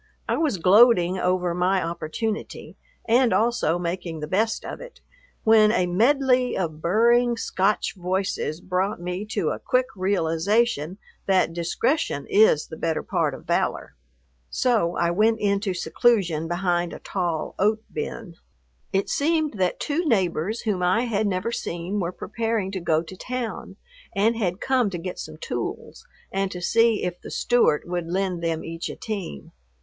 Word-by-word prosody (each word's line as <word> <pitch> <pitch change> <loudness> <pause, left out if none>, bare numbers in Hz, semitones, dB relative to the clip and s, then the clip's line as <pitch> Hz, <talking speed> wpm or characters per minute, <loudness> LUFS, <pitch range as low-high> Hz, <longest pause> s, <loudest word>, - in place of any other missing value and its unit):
I - - +1
was 300 -11 0
gloating 185 -1 +5
over 180 -1 +1
my 180 +2 +2
opportunity, 170 +6 -4 0.3
and 240 +1 +4
also 230 -7 +2
making 175 -1 -4
the 150 - -4
best 220 +7 0
of - - -7
it, - - -11 0.4
when 220 -1 +6
a 185 -5 +2
medley 250 +6 +2
of 160 -4 -3
burring 235 +6 +3
Scotch 200 -1 0
voices 185 -3 -2
brought 185 +2 -1
me 180 +3 -4
to 205 -7 -1
a - - -3
quick 255 -1 +1
realization 185 0 +1 0.3
that 185 -3 +3
discretion 170 - -1
is 205 -7 +5
the 160 - -10
better 165 -1 -1
part - - 0
of - - -13
valor. - - -1 0.6
So 220 -9 +1
I 170 0 +1
went 220 +5 +2
into 200 -2 0
seclusion 175 -2 +1
behind 175 0 0
a - - -8
tall 175 -5 -3
oat 215 +2 +2
bin. 175 -7 -5 0.5
It 195 0 0
seemed 310 -6 0
that 185 -1 0
two 310 +4 -1
neighbors 195 - 0
whom 205 -5 -1
I 180 +6 +3
had 220 -3 0
never 195 +4 -1
seen 175 -1 -3
were 175 -2 -1
preparing 220 0 -2
to 190 - -3
go 160 -2 +1
to 180 +3 -10
town, 250 +3 -5 0.4
and 215 +4 +3
had 190 -4 -1
come 255 -5 +1
to 180 - -4
get 180 +2 -6
some 155 0 -7
tools 120 -6 -5 0.2
and 195 0 -1
to 180 - -6
see 225 +4 +2
if 180 -1 -3
the - - -9
Stewart 240 -11 +2
would 175 -1 -3
lend 180 -1 -2
them 165 -1 -1
each 165 +1 -5
a - - -6
team. 195 - -6
190 Hz, 160 wpm, -24 LUFS, 175-225 Hz, 0.6 s, when